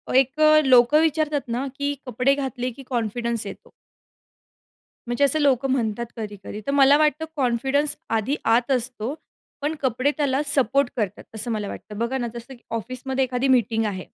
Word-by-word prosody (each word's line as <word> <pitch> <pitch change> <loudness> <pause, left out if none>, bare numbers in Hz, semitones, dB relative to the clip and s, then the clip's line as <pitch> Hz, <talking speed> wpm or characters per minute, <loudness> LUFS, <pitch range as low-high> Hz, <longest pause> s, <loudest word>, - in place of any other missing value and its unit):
एक 270 +3 +3
अ, 310 0 +7
लोकं 255 +3 +6
विचारतात 310 -2 +1
ना 240 +3 -2
की 285 0 -1
कपडे 250 +2 +2
घातले 260 -3 -3
की 270 +4 -12
कॉन्फिडन्स 235 -1 -2
येतो. - - -10 1.4
म्हणजे 240 +4 0
असं 280 +3 +3
लोकं 270 -2 +2
म्हणतात 235 -2 -1
कधी-कधी. 210 -1 -7
तर - - +1
मला 280 0 +6
वाटतं 305 +1 +2
कॉन्फिडन्स 270 +3 +1 0.2
आधी 260 +7 -1 0.2
आत 245 +3 0
असतो. 250 0 -1 0.5
पण 300 +2 -1
कपडे 260 +2 +1
त्याला 280 -1 +1
सपोर्ट 275 -1 +2
करतात, 210 -3 -2
असं 230 +2 -3
मला 210 -2 -2
वाटतं. 210 +1 -8
बघा 235 +4 -1
ना 240 - -2
जसं 235 +2 -9
की 240 - -17
ऑफिसमध्ये 260 +3 -3
एखादी 255 +1 -1
मीटिंग 230 -3 +2
आहे. 190 -3 -4
255 Hz, 165 wpm, -23 LUFS, 235-280 Hz, 1.4 s, अ